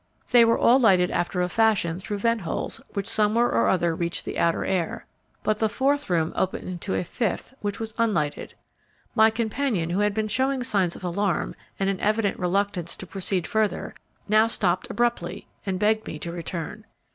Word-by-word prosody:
They 240 -1 +8
were 230 0 +4
all 250 +3 +5
lighted 185 -7 +4
after 175 +1 0
a - - +1
fashion 185 -5 +2
through 205 +2 -4
vent 230 +2 +1
holes 170 - -4
which 200 0 -3
somewhere 225 +2 +2
or 115 0 +2
other 170 -3 +2
reached 170 0 -3
the - - -4
outer 170 0 +1
air, 185 -4 -1 0.4
but 215 0 +1
the 220 - +2
fourth 280 +4 0
room 165 -2 +1
opened 190 - -1
into 185 +1 -3
a - - 0
fifth 220 +6 -3
which 205 -1 -3
was 220 -1 -5
unlighted. 170 -11 0 0.6
My 220 -1 +6
companion, 220 -5 -1
who 185 - 0
had 205 -1 +1
been 220 -1 0
showing 260 +3 0
signs 195 -7 +1
of - - -11
alarm 185 +2 -1 0.3
and 195 - +1
an 195 -1 0
evident 210 0 +1
reluctance 180 -1 -1
to - - -9
proceed 185 0 -2
further, 220 -2 -1 0.3
now 215 +2 +5
stopped 185 -5 0
abruptly 235 -8 -1 0.2
and 190 -1 0
begged 215 +2 +1
me 155 - -5
to 170 +3 -5
return. 170 +4 -5
200 Hz, 185 wpm, -25 LUFS, 175-220 Hz, 0.6 s, They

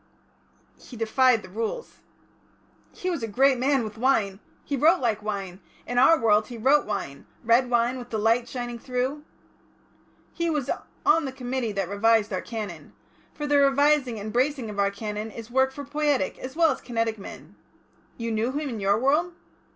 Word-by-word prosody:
"He 245 - -12
defied 230 +1 +3
the - - -11
Rules." 230 - -5 0.9
"He 370 - -3
was 335 - -3
a 225 - -2
great 260 +4 +3
man 270 0 +2
with 215 0 -7
wine. 215 -7 +1 0.3
He 285 - -2
wrote 310 +5 +4
like 225 -4 0
wine; 195 -3 -5 0.3
in 245 0 0
our 320 +5 +6
world 215 -2 +3
he 240 - -8
wrote 270 +5 +3
wine; 195 -10 -5 0.2
red 235 +2 +3
wine 240 +1 +1
with 245 0 -9
the 220 - -2
light 230 +3 +2
shining 240 -2 -5
through." 255 +4 -2 1.1
"He 340 -1 -1
was 295 -5 -1 0.3
on 320 -1 +4
the 265 - -3
Committee 255 -3 -3
that 195 -2 -2
revised 215 +2 +2
our 185 - -1
Canon. 205 -9 -7 0.4
For 295 - -4
the 290 -1 +3
revising 280 -3 +3
and 210 +1 -6
bracing 255 -2 0
of 205 - -6
our 200 0 +3
Canon 210 +1 -5
is 230 +2 -10
work 265 +1 +3
for 285 +1 -8
poietic 290 -7 0
as 260 +2 -7
well 330 -2 +4
as 265 - -4
kinetic 230 -2 -2
men. 195 - -11 0.6
You 230 -1 -3
knew 225 +4 -1
him 295 0 -2
in 230 -4 -5
your 200 +1 +2
world?" 300 +8 +1
240 Hz, 180 wpm, -25 LUFS, 215-275 Hz, 1.1 s, our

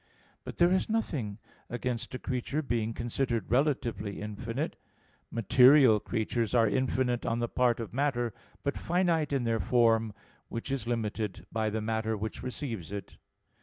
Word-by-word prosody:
But - - -8
there 175 +1 +5
is 190 +3 +1
nothing 140 - -1 0.3
against 120 0 -3
a - - -1
creature 130 +5 -2
being 115 -4 -1
considered 120 -2 -2
relatively 120 -7 0
infinite. 115 +7 -4 0.5
Material 125 +1 +6
creatures 115 +2 -1
are 115 -2 +5
infinite 125 +1 0
on 115 - 0
the 120 0 0
part 120 -1 +2
of 115 -3 -6
matter, 120 -4 0 0.3
but 140 - -1
finite 170 -4 +1
in 135 -3 +1
their 115 -1 +1
form, 115 -3 +3 0.4
which 115 +3 -5
is 135 -3 -2
limited 110 -4 -2
by 110 -1 0
the 110 +1 -2
matter 110 0 -1
which 110 +2 -5
receives 120 - -5
it. 100 -1 -7
120 Hz, 150 wpm, -30 LUFS, 110-130 Hz, 0.5 s, Material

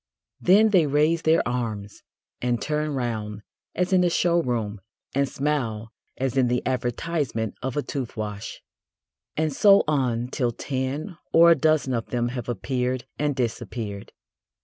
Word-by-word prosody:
Then 210 +5 +5
they 180 -7 +4
raise 155 +4 +2
their 160 -3 +3
arms 110 -5 -4 0.4
and 120 -1 0
turn 150 +1 -1
round 110 -4 -3 0.3
as 180 +2 0
in 180 -1 +5
a 175 - +3
showroom 125 - 0 0.3
and 140 0 +1
smile 115 -7 -2 0.3
as 130 -1 -1
in 130 -2 +3
the 125 0 0
advertisement 125 -2 -1
of 130 +1 -3
a 145 - +1
tooth 130 -6 -5
wash. 105 0 -5 0.7
And 155 -1 0
so 200 +6 +6
on 125 -5 0
till 125 -3 -1
ten 140 - -4
or 170 +1 +7
a - - +7
dozen 155 -3 +2
of 115 -2 -2
them 120 -1 -1
have 125 -1 -5
appeared 125 +2 -2
and 145 -1 0
disappeared. 115 -4 -4
130 Hz, 150 wpm, -25 LUFS, 115-155 Hz, 0.7 s, or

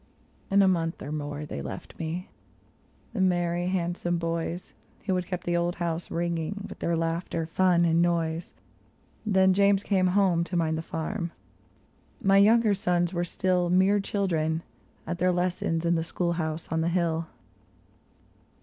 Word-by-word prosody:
In 200 0 +5
a - - +5
month 165 -2 0
or 145 - -6
more 145 0 -4
they 70 - -5
left 70 - -8
me 165 +3 -3 0.4
— - - -35
the 210 - -1
merry, 175 -1 +1
handsome 175 -1 -1
boys, 165 +1 -3 0.3
Who 190 - +1
had 180 -1 -1
kept 180 -2 -4
the 175 - 0
old 175 +1 0
house 170 -1 -3
ringing 170 +4 -2
with - - -10
their 170 0 0
laughter, 165 0 -1
fun, 175 +1 +3
and 165 0 +3
noise. 170 -1 0 0.7
Then 190 -2 +4
James 200 0 +3
came 190 -3 +2
home 180 -4 +3
to 175 - -2
mind 160 -1 +1
the 160 - -2
farm; 170 +3 -4 0.9
my 195 -5 +4
younger 215 +1 +5
sons 180 -2 0
were 175 -1 0
still 180 0 0
Mere 190 +3 +4
children, 165 -5 -1 0.4
at 170 +1 -4
their 185 +1 +3
lessons 175 -2 0
in 170 - +3
the 165 -1 +1
school 170 +1 -1
house 160 -1 -3
on 160 0 +1
the 165 - +1
hill. 170 -2 0
175 Hz, 165 wpm, -27 LUFS, 165-185 Hz, 0.9 s, In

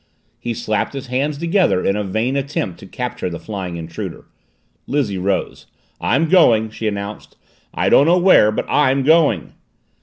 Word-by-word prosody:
He 120 -1 -4
slapped 110 -1 -2
his 135 -1 -6
hands 135 +4 -2
together 170 - +1
in 100 - +2
a 105 - -1
vain 110 +7 -1
attempt 135 - -3
to - - -12
capture - - -4
the 85 - -6
flying 95 -3 -6
intruder. 80 0 -7 0.6
Lizzie 115 -10 -1
rose. 95 +1 -2 0.3
"I'm 155 +7 +1
going!" 115 - +4
she 110 0 -4
announced. 100 0 -6 0.3
"I - - -1
don't 140 - +5
know 175 +2 +5
where, 175 - +5
but - - -3
I'm 135 -2 +2
going!" 160 +1 +2
120 Hz, 160 wpm, -19 LUFS, 100-145 Hz, 0.6 s, don't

